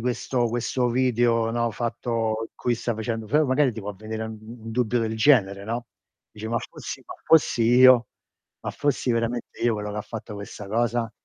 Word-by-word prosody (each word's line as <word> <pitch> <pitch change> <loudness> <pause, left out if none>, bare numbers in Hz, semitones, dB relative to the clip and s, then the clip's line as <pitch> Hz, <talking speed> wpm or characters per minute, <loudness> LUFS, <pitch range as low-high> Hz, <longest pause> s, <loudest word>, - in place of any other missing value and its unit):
questo 120 0 0
questo 120 +2 0
video, 120 -2 +2
no, 120 0 0
fatto 115 -1 -2
in - - -64
cui 120 - 0
stai 120 0 -2
facendo 110 0 -3
f 110 - -15
magari 130 -1 +2
ti 110 - -7
può 105 0 -5
vedere 110 +2 -5
u - - -4
un 110 +1 -10
dubbio 120 0 +1
del 110 -1 -2
genere, 100 -6 +3
no, 120 +2 -3 0.4
dici: 110 +1 -8
"Ma 115 +1 +1
fossi - - -8
ma - - -8
fossi 155 -7 +4
io, 125 +1 +7 0.5
ma - - -4
fossi 135 -3 0
veramente 115 +1 -2
io 120 - +3
quello 105 -1 -4
che 105 - -3
fatto 110 0 -7
questa 100 0 -8
cosa?" 115 +1 0
115 Hz, 185 wpm, -25 LUFS, 110-120 Hz, 0.5 s, io